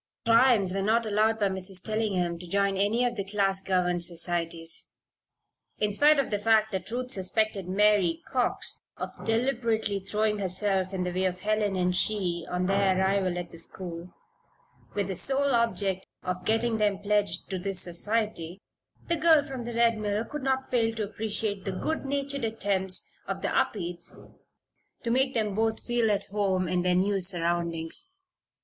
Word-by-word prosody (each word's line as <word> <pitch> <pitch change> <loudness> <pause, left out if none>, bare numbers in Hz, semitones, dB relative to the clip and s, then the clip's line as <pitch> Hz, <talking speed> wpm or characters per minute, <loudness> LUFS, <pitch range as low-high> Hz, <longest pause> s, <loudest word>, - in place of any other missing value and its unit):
"Primes" 230 -5 +5
were 195 - -1
not 225 +3 +2
allowed 215 +1 +2
by 205 - +3
Mrs. 190 0 -3
Tellingham 195 -6 -1
to 180 - -9
join 200 +2 +1
any 210 +5 +2
of 240 -1 -1
the 200 - -2
class 195 -1 +1
governed 180 -2 +1
societies. 170 -1 -2 0.9
In 210 -1 0
spite 295 +7 +5
of 275 -4 0
the 205 - 0
fact 220 0 +3
that 190 -1 -4
Ruth 250 +2 -3
suspected 195 -1 0
Mary 195 -4 +3
Cox 250 -2 -1 0.2
of - - -4
deliberately 225 -3 +1
throwing 210 +2 0
herself 190 0 0
in 180 - -1
the 180 - -2
way 185 +1 0
of 185 0 -2
Helen 210 -1 +1
and 180 -1 +1
she 180 -4 0
on 180 0 -1
their 195 0 +2
arrival 190 -1 +1
at 175 -1 -5
the 165 - -9
school, 175 0 -6 0.8
with 200 -2 0
the 190 - -3
sole 275 +6 +2
object 200 -5 0 0.2
of 180 0 -3
getting 225 0 +1
them 205 -2 +2
pledged 205 -3 0
to 190 - -2
this 195 0 -2
society, 185 -1 0 0.5
the 340 - +2
girl 320 -2 +5
from 265 -4 -6
the 235 -1 -5
Red 230 -1 +3
Mill 210 +1 -1
could 300 +3 -6
not 265 0 -1
fail 225 -2 +2
to 220 - -2
appreciate 210 -1 -3
the 195 - -2
good 315 +11 -2
natured 280 -1 -2
attempts 200 -4 0 0.2
of - - -4
the - - +1
Upedes 175 -4 -1 0.9
to 230 - -1
make 265 +2 +2
them 215 -3 0
both 220 +2 0
feel 240 -2 +1
at 205 -1 +1
home 190 -3 +1
in 180 +1 +1
their 180 0 +2
new 195 +2 +2
surroundings. 170 - -1
200 Hz, 170 wpm, -28 LUFS, 185-225 Hz, 0.9 s, Primes